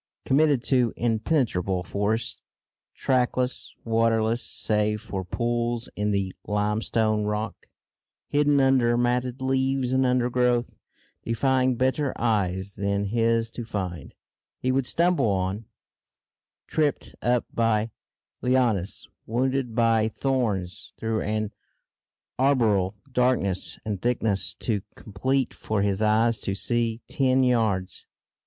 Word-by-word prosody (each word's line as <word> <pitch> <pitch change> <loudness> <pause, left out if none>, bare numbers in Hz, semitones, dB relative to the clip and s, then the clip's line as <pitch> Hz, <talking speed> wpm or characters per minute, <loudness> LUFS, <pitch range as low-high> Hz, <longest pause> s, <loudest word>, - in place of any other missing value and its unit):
Committed 145 -2 +3
to 125 -4 +2
impenetrable 110 - 0
forests, 105 +5 -1 0.5
trackless, 125 -1 0
waterless 115 0 +2
save 105 -1 0
for 95 -2 -5
pools 120 +4 -2
in 105 +1 -1
the 100 -2 -1
limestone 105 +1 +1
rock, 105 0 -3 0.6
hidden 145 0 +3
under 130 -3 +3
matted 125 +1 0
leaves 130 -1 +1
and 130 0 +3
undergrowth, 125 -1 +1 0.5
defying 130 +2 +1
better 130 +3 0
eyes 100 -4 0
than 100 +1 -1
his 115 0 +1
to 120 - -6
find, 90 -8 -5 0.4
he 130 - 0
would 130 -1 +1
stumble 170 -6 +2
on, 95 +2 -1 1.0
tripped 150 -3 -1
up 120 0 +1
by 115 -1 +1 0.5
lianas, 120 -7 +1 0.2
wounded 125 0 0
by 115 -2 +3
thorns, 110 -8 -2
through 110 -1 -1
an 110 0 -2 0.9
arboreal 110 -8 +2 0.2
darkness 125 -7 +1
and 105 -4 -3
thickness 110 -5 0
too 105 -4 -1
complete 130 +6 -1
for 105 -2 -2
his 100 0 0
eyes 110 +1 +3
to 95 - -3
see 115 +2 -1
ten 130 -2 +2
yards. 110 -7 0
115 Hz, 110 wpm, -25 LUFS, 105-125 Hz, 1.0 s, Committed